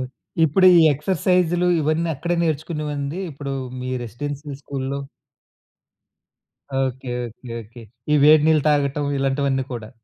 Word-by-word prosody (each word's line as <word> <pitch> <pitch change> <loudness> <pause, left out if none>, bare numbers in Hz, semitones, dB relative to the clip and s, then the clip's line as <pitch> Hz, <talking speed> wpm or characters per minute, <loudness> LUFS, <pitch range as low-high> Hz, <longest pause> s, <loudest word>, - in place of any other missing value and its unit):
Okay. 130 - -4 0.4
ఇప్పుడు 175 +5 +4
ఈ - - +7
exercise 180 +3 +1 0.3
ఇవన్నీ 155 +3 0
అక్కడే 170 +5 -2
నేర్చుకునేవండి 150 0 -3
ఇప్పుడు 140 -1 -6 0.3
మీ 130 0 -4
రెసిడెన్షియల్ 140 +4 -6
స్కూల్‌లో? 140 0 -4 1.8
ఓకే. 130 -1 -3
ఓకే. 115 +1 -11
ఓకే. 115 +3 -14 0.3
ఈ - - +5
వేడి 155 0 +7
నీళ్ళు 155 -2 +3
తాగటం 145 0 +1
ఇలాంటివన్నీ 135 -1 0
కూడా? 110 -3 -6
140 Hz, 120 wpm, -22 LUFS, 130-155 Hz, 1.8 s, ఈ